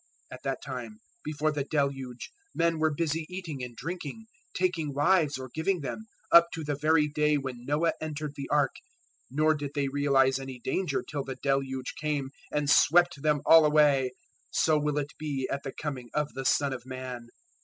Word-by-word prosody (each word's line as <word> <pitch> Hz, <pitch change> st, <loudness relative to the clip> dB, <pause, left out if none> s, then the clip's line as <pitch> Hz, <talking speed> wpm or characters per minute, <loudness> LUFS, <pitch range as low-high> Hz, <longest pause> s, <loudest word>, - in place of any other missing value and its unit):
024:038 -, -, -6 dB
At -, -, -33 dB
that 135 Hz, -2 st, -2 dB
time, 120 Hz, -5 st, -6 dB, 0.3 s
before 155 Hz, 0 st, 0 dB
the 145 Hz, -2 st, -2 dB
Deluge, 135 Hz, -4 st, -2 dB, 0.2 s
men 165 Hz, -1 st, +1 dB
were 155 Hz, 0 st, +3 dB
busy 155 Hz, +1 st, -1 dB
eating 170 Hz, -8 st, -5 dB
and 120 Hz, -1 st, -7 dB
drinking, 175 Hz, -, -6 dB, 0.3 s
taking 165 Hz, -6 st, 0 dB
wives 150 Hz, -1 st, +3 dB
or 130 Hz, -1 st, -8 dB
giving 165 Hz, +2 st, 0 dB
them, 145 Hz, -, -5 dB, 0.3 s
up 170 Hz, 0 st, +9 dB
to 160 Hz, -, -5 dB
the 145 Hz, 0 st, -1 dB
very 150 Hz, +1 st, +3 dB
day 150 Hz, 0 st, +2 dB
when 130 Hz, -3 st, -6 dB
Noah 155 Hz, +4 st, +2 dB
entered 155 Hz, -1 st, -4 dB
the 140 Hz, -1 st, -6 dB
Ark, 145 Hz, -3 st, +2 dB, 0.5 s
024:039 135 Hz, -, -9 dB
nor 155 Hz, +1 st, +4 dB
did 145 Hz, -2 st, -4 dB
they 140 Hz, -1 st, +1 dB
realise 135 Hz, -1 st, +3 dB
any 135 Hz, -1 st, -7 dB
danger 135 Hz, +4 st, -1 dB
till 145 Hz, -2 st, -3 dB
the 130 Hz, -1 st, -6 dB
Deluge 135 Hz, -2 st, -1 dB
came 145 Hz, -3 st, -1 dB, 0.2 s
and 150 Hz, -1 st, 0 dB
swept 170 Hz, +1 st, +5 dB
them 150 Hz, -1 st, +2 dB
all 165 Hz, -1 st, +8 dB
away; 145 Hz, -4 st, +4 dB, 0.4 s
so 155 Hz, -, +2 dB
will 150 Hz, 0 st, -1 dB
it 145 Hz, 0 st, -2 dB
be 140 Hz, -4 st, -2 dB
at 140 Hz, -, -2 dB
the 135 Hz, -, -5 dB
Coming 130 Hz, -6 st, -5 dB
of 150 Hz, -1 st, 0 dB
the 135 Hz, 0 st, -5 dB
Son 140 Hz, +1 st, +2 dB
of 125 Hz, -2 st, -6 dB
Man. 130 Hz, -2 st, -7 dB
145 Hz, 190 wpm, -28 LUFS, 135-155 Hz, 0.5 s, up